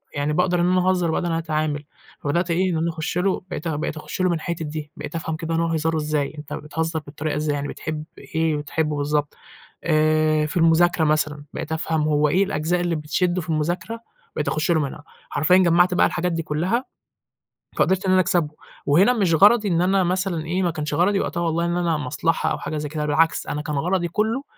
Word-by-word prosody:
يعني 145 Hz, +1 st, 0 dB
باقدر 180 Hz, +1 st, +2 dB
إن -, -, +3 dB
أنا 185 Hz, 0 st, +3 dB
أهزر 180 Hz, -3 st, +1 dB
باقدر 175 Hz, -, -1 dB
إن -, -, -1 dB
أنا 165 Hz, -, 0 dB
أتعامل، 155 Hz, -2 st, -2 dB, 0.4 s
فبدأت 170 Hz, +4 st, 0 dB
إيه 185 Hz, +2 st, +1 dB
إن 165 Hz, -, 0 dB
أنا 165 Hz, +1 st, 0 dB
أخُش 160 Hz, +1 st, -3 dB
له 185 Hz, +1 st, +1 dB
بقيت 170 Hz, -2 st, -4 dB
بقيت 155 Hz, 0 st, -2 dB
أخُش 170 Hz, -, -5 dB
له 185 Hz, -, +3 dB
من 170 Hz, -, +1 dB
الحِتَت 165 Hz, +1 st, -4 dB
دي، 150 Hz, 0 st, -6 dB
بقيت -, -, -7 dB
أفهم 160 Hz, -1 st, -3 dB
كده 165 Hz, 0 st, -3 dB
إن 165 Hz, -, +1 dB
هو 170 Hz, -, +1 dB
هزاره 160 Hz, 0 st, 0 dB
إزاي، 150 Hz, -1 st, -1 dB
أنت 150 Hz, -1 st, -8 dB
بتهزّر 160 Hz, +2 st, -3 dB
بالطريقة 150 Hz, +1 st, -4 dB
إزاي، 150 Hz, -1 st, 0 dB
يعني 145 Hz, 0 st, -3 dB
بتحب 155 Hz, 0 st, -5 dB, 0.3 s
إيه 160 Hz, -1 st, +2 dB
وتحبه 150 Hz, 0 st, -2 dB
بالضبط، 145 Hz, 0 st, -1 dB, 0.5 s
آآ 155 Hz, -1 st, +3 dB
في 150 Hz, -, -3 dB
المذاكرة 165 Hz, 0 st, +4 dB
مثلًا 150 Hz, -1 st, 0 dB
بقيت 160 Hz, -1 st, -5 dB
أفهم 160 Hz, 0 st, -1 dB
هو 150 Hz, 0 st, +2 dB
إيه 185 Hz, +6 st, +3 dB
الأجزاء 175 Hz, -2 st, -1 dB
اللي 175 Hz, -1 st, 0 dB
بتشده 175 Hz, +4 st, 0 dB
في 165 Hz, -, -10 dB
المذاكرة 170 Hz, +8 st, -2 dB, 0.4 s
بقيت 150 Hz, -, -2 dB
أخُش 155 Hz, +2 st, 0 dB
له 160 Hz, -, +3 dB
منها 145 Hz, +1 st, -5 dB, 0.3 s
حرفيًا، 180 Hz, +5 st, +3 dB
جمعت 175 Hz, 0 st, +4 dB
بقى 180 Hz, -, +4 dB
الحاجات 180 Hz, 0 st, -1 dB
دي 165 Hz, -1 st, -2 dB
كلّها 180 Hz, -, -1 dB, 0.9 s
فقدرت 190 Hz, +1 st, +2 dB
إن 185 Hz, -, +2 dB
أنا 185 Hz, -, +5 dB
أكسبه، 175 Hz, -4 st, +1 dB, 0.4 s
وهنا 185 Hz, +12 st, +5 dB
مش 195 Hz, -8 st, +2 dB
غرضي 210 Hz, +5 st, +5 dB
إن 170 Hz, -2 st, +2 dB
أنا 190 Hz, +1 st, +3 dB
مثلًا 180 Hz, -3 st, -1 dB
إيه، 185 Hz, +3 st, 0 dB
ما 175 Hz, -, +2 dB
كانش 150 Hz, -2 st, -3 dB
غرضي 190 Hz, +5 st, +2 dB
وقتها 170 Hz, -, -2 dB
والله 170 Hz, 0 st, 0 dB
إن 170 Hz, 0 st, -1 dB
أنا 170 Hz, -3 st, +1 dB
مصلحة 150 Hz, +4 st, -1 dB
أو -, -, -2 dB
حاجة 155 Hz, -, -4 dB
زي 150 Hz, 0 st, -3 dB
كده، 150 Hz, 0 st, -3 dB
بالعكس 155 Hz, +1 st, +2 dB
أنا 150 Hz, -, -3 dB
كان 150 Hz, -1 st, -3 dB
غرضي 175 Hz, +4 st, 0 dB
كلّه 220 Hz, -, -1 dB
165 Hz, 215 wpm, -23 LUFS, 150-175 Hz, 0.9 s, أنا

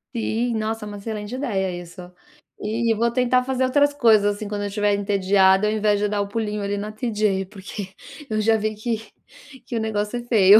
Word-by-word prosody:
Sim, 235 Hz, +1 st, 0 dB
nossa, 220 Hz, 0 st, -2 dB
é -, -, -7 dB
uma 205 Hz, 0 st, -7 dB
excelente 210 Hz, +1 st, -5 dB
ideia 195 Hz, -9 st, -1 dB
isso. 175 Hz, +2 st, -12 dB, 0.6 s
E 225 Hz, +2 st, +1 dB
vou 235 Hz, +2 st, +2 dB
tentar 250 Hz, 0 st, +2 dB
fazer 260 Hz, 0 st, 0 dB
outras 285 Hz, +3 st, +3 dB
coisas, 215 Hz, -6 st, +4 dB
assim, 210 Hz, 0 st, -6 dB
quando 205 Hz, 0 st, -3 dB
eu 205 Hz, -, -1 dB
estiver 205 Hz, 0 st, +1 dB
entediada 195 Hz, 0 st, +3 dB
ao 215 Hz, -, +1 dB
invés 210 Hz, -1 st, +2 dB
de 210 Hz, -, +1 dB
dar 205 Hz, 0 st, 0 dB
o 200 Hz, -, -2 dB
pulinho 210 Hz, 0 st, -2 dB
ali 200 Hz, 0 st, -1 dB
na 210 Hz, +1 st, -4 dB
TJ 210 Hz, -4 st, 0 dB
porque, 195 Hz, 0 st, -7 dB, 0.4 s
eu 215 Hz, -1 st, 0 dB
já 225 Hz, +1 st, +4 dB
vi 215 Hz, 0 st, -1 dB
que, 220 Hz, +1 st, -2 dB, 0.6 s
que 240 Hz, -, -5 dB
o -, -, +1 dB
negócio 220 Hz, +1 st, -1 dB
é -, -, -8 dB
feio. 215 Hz, -3 st, +7 dB
210 Hz, 210 wpm, -23 LUFS, 205-230 Hz, 0.6 s, feio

